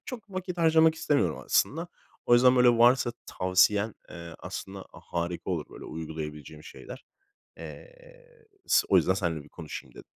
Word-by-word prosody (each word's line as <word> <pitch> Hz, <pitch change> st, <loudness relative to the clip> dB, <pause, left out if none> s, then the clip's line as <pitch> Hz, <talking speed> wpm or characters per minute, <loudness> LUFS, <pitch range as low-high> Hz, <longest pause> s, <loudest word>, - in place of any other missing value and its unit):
Çok 230 Hz, -5 st, -9 dB
vakit 185 Hz, -1 st, -5 dB
harcamak 160 Hz, -1 st, +4 dB
istemiyorum 145 Hz, -3 st, 0 dB
aslında. 165 Hz, +4 st, +1 dB, 0.4 s
O 120 Hz, -, +5 dB
yüzden 125 Hz, +1 st, +5 dB
böyle 125 Hz, 0 st, +6 dB
varsa 120 Hz, +1 st, +4 dB
tavsiyen, 100 Hz, +4 st, +2 dB, 0.2 s
eee, 85 Hz, -1 st, -9 dB
aslında 95 Hz, 0 st, -8 dB
harika 85 Hz, +2 st, -5 dB
olur 80 Hz, -5 st, -2 dB
böyle -, -, -11 dB
uygulayabileceğim 75 Hz, -1 st, -8 dB
şeyler. 125 Hz, -, -11 dB, 0.5 s
Eee, -, -, -11 dB, 0.7 s
s -, -, +4 dB
o 95 Hz, -, +4 dB
yüzden 90 Hz, +1 st, +3 dB
seninle 85 Hz, -6 st, -3 dB
bir -, -, -17 dB
konuşayım 80 Hz, -1 st, -9 dB
dedim. -, -, -12 dB
100 Hz, 145 wpm, -27 LUFS, 85-140 Hz, 0.7 s, böyle